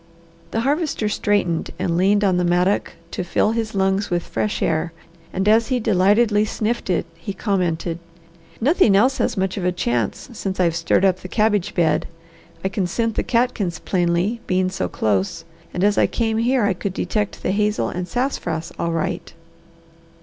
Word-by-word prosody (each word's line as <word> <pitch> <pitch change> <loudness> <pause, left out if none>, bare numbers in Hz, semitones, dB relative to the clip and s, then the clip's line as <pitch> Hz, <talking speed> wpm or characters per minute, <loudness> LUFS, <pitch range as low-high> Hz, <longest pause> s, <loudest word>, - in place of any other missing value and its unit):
The 225 - -1
Harvester 285 -3 0
straightened 205 -5 0
and 170 - -1
leaned 200 +4 +3
on 190 -3 +3
the 180 - +1
mattock 180 +3 +1 0.2
to - - -3
fill 190 +4 +1
his 225 -2 -2
lungs 195 +1 +1
with 175 -2 0
fresh 210 - -2
air 160 +1 0 0.4
and 190 +2 -1
as 225 +2 +4
he 255 -2 0
delightedly 210 +1 +3
sniffed 215 +1 -2
it 175 -3 +1
he 170 +4 -7
commented, 175 -5 -1 0.6
"Nothing 260 - +4
else 255 +7 +3
has - - 0
much 190 0 -1
of 190 - -3
a 180 - +2
chance 120 - -1
since 195 -4 -4
I've 170 -3 +2
stirred 170 +3 +2
up 185 -1 +2
the - - -8
cabbage 210 -2 +1
bed. 160 -4 +2 0.6
I - - +1
can 195 -3 -1
scent 230 +4 -1
the - - 0
catkins 230 -8 0
plainly, 180 +5 0
being 185 0 +1
so 190 - -2
close, 100 -3 -1 0.3
and 180 - -2
as 205 0 +3
I - - +4
came 225 -2 -1
here 245 +1 +2
I 205 -1 +2
could 190 +1 -4
detect 210 -2 -2
the - - +1
hazel 210 +1 +1
and 180 0 -4
sassafras 175 - -2
all 170 - 0
right." 165 - -2
195 Hz, 180 wpm, -21 LUFS, 175-220 Hz, 0.6 s, as